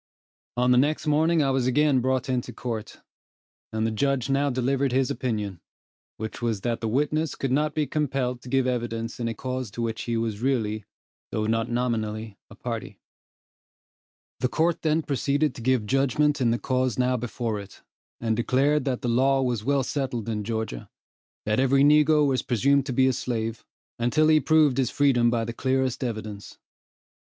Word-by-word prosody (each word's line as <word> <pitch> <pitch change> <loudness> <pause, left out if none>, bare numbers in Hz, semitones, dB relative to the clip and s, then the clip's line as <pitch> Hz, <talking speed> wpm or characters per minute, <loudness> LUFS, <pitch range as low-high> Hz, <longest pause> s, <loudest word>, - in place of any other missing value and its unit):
On 125 +1 +3
the 125 - +5
next 150 +3 +1
morning 155 +2 +3
I 135 - +1
was 130 -2 +1
again 140 +1 +3
brought 130 0 0
into 125 -2 -2
court, 115 -4 -6 0.7
and 110 0 -1
the 110 - 0
judge 135 +2 0
now 140 +1 +2
delivered 130 +1 0
his 130 0 +1
opinion, 105 -7 -3 0.6
which 110 +2 -6
was 115 -4 -1
that 120 +1 -2
the 115 - -1
witness 150 +6 0
could 135 - -2
not 150 +2 +1
be 155 - +1
compelled 135 -5 -1
to 125 - -10
give 135 0 +2
evidence 115 -2 -3
in 120 - -1
a 115 - -3
cause 130 0 -4
to 120 - -6
which 115 -1 -3
he 115 -1 -1
was 110 -2 -2
really, 110 -5 0 0.4
though 110 0 -2
not 115 +1 0
nominally, 110 -3 -2
a - - -13
party. - - -5 1.4
The - - +1
court 165 +6 0
then 160 0 +1
proceeded 140 +1 0
to - - -9
give 125 -2 +1
judgment 140 +4 +1
in 120 - +3
the 115 - +1
cause 130 -1 -1
now 125 0 +2
before 115 -2 -3
it, 100 -1 -12 0.4
and 115 -1 0
declared 135 +5 +2
that 130 -3 -2
the - - -1
law 135 +3 +3
was 120 -4 -1
well 140 +2 +1
settled 130 -4 -3
in 105 -2 -2
Georgia 110 - -4 0.6
that 105 +2 +1
every 135 +1 +4
negro 150 +1 +5
was 135 -2 +1
presumed 135 +2 +2
to - - -2
be 130 +1 +3
a 130 - +3
slave, 115 -2 -3 0.4
until 150 +7 +3
he 155 -1 +6
proved 155 -4 +3
his 130 -3 +1
freedom 130 -5 +3
by 115 -1 0
the 115 - -5
clearest 130 +1 0
evidence. 110 -4 -5
125 Hz, 180 wpm, -25 LUFS, 115-140 Hz, 1.4 s, he